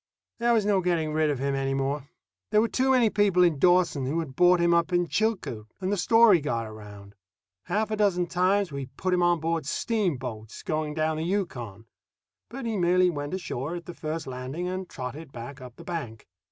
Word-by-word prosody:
There 235 Hz, 0 st, +3 dB
was 220 Hz, -3 st, +2 dB
no 200 Hz, -2 st, +3 dB
getting 165 Hz, -4 st, 0 dB
rid 155 Hz, 0 st, +2 dB
of 145 Hz, -, 0 dB
him 140 Hz, +2 st, -1 dB
any 135 Hz, 0 st, -1 dB
more. 135 Hz, +1 st, -2 dB, 0.4 s
There 210 Hz, -, +4 dB
were 225 Hz, -, +3 dB
too 260 Hz, +3 st, 0 dB
many 245 Hz, -5 st, +4 dB
people 195 Hz, -3 st, +3 dB
in 165 Hz, -5 st, +2 dB
Dawson 175 Hz, -6 st, +3 dB
who 150 Hz, +5 st, -1 dB
had 145 Hz, -5 st, -5 dB
bought 180 Hz, +2 st, +5 dB
him 170 Hz, 0 st, +3 dB
up 170 Hz, +1 st, +2 dB
on 175 Hz, 0 st, +2 dB
Chilcoot, 190 Hz, -, -1 dB
and 190 Hz, 0 st, -2 dB
the -, -, +2 dB
story 215 Hz, -1 st, +5 dB
got 120 Hz, -6 st, -2 dB
around. 105 Hz, -2 st, -11 dB, 0.5 s
Half 215 Hz, +4 st, -1 dB
a -, -, +1 dB
dozen 190 Hz, -4 st, +2 dB
times 185 Hz, +2 st, +1 dB
we 140 Hz, -2 st, -5 dB
put 185 Hz, +7 st, -3 dB
him 180 Hz, -, +2 dB
on 175 Hz, -1 st, +3 dB
board 165 Hz, -2 st, -2 dB
steamboats 130 Hz, -, -2 dB
going 155 Hz, -1 st, -2 dB
down 155 Hz, 0 st, 0 dB
the 160 Hz, -, -2 dB
Yukon; 125 Hz, -, -3 dB, 0.6 s
but 260 Hz, +2 st, -7 dB
he 225 Hz, -2 st, -1 dB
merely 180 Hz, 0 st, +3 dB
went 145 Hz, +2 st, -4 dB
ashore 165 Hz, -3 st, -4 dB
at 170 Hz, -1 st, -7 dB
the 175 Hz, -, -7 dB
first 155 Hz, 0 st, -4 dB
landing 130 Hz, +7 st, -5 dB
and 185 Hz, 0 st, -4 dB
trotted 135 Hz, +3 st, -7 dB
back 120 Hz, +3 st, -9 dB
up 125 Hz, -2 st, -10 dB
the -, -, -12 dB
bank. 140 Hz, -11 st, -6 dB
170 Hz, 205 wpm, -27 LUFS, 135-185 Hz, 0.6 s, bought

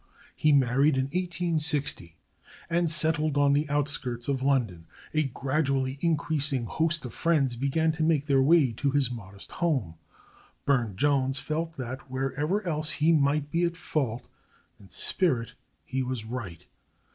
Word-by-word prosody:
He 155 Hz, -, +3 dB
married 135 Hz, +1 st, +3 dB
in 130 Hz, -, +2 dB
1860, 155 Hz, -, -1 dB, 0.5 s
and 170 Hz, 0 st, +2 dB
settled 155 Hz, -1 st, +1 dB
on 140 Hz, 0 st, +4 dB
the 150 Hz, +1 st, +1 dB
outskirts 140 Hz, -5 st, -1 dB
of 135 Hz, -2 st, -1 dB
London. 120 Hz, -12 st, 0 dB, 0.3 s
A 155 Hz, -1 st, +2 dB
gradually 135 Hz, 0 st, -1 dB
increasing 145 Hz, -5 st, 0 dB
host 160 Hz, +3 st, 0 dB
of 120 Hz, -, -7 dB
friends 145 Hz, -7 st, +1 dB
began 140 Hz, +6 st, +1 dB
to 160 Hz, +1 st, -5 dB
make 155 Hz, -3 st, +2 dB
their 140 Hz, -3 st, +3 dB
way 145 Hz, -2 st, +4 dB
to 140 Hz, +5 st, -1 dB
his 135 Hz, -3 st, +1 dB
modest 100 Hz, -4 st, -10 dB
home. 130 Hz, -, -1 dB, 0.7 s
Burne 120 Hz, -8 st, +1 dB
Jones 135 Hz, +1 st, +1 dB
felt 160 Hz, +3 st, -3 dB
that, 130 Hz, +1 st, -6 dB
wherever 145 Hz, +10 st, -1 dB
else 155 Hz, -2 st, -1 dB
he 160 Hz, +2 st, +3 dB
might 145 Hz, 0 st, +1 dB
be 170 Hz, +1 st, +1 dB
at 170 Hz, -1 st, 0 dB
fault, 125 Hz, -8 st, -2 dB, 0.5 s
in 95 Hz, -, -16 dB
spirit 130 Hz, -11 st, 0 dB, 0.3 s
he 130 Hz, +10 st, -2 dB
was 125 Hz, -3 st, -3 dB
right. 110 Hz, -8 st, -6 dB
140 Hz, 145 wpm, -27 LUFS, 130-155 Hz, 0.7 s, on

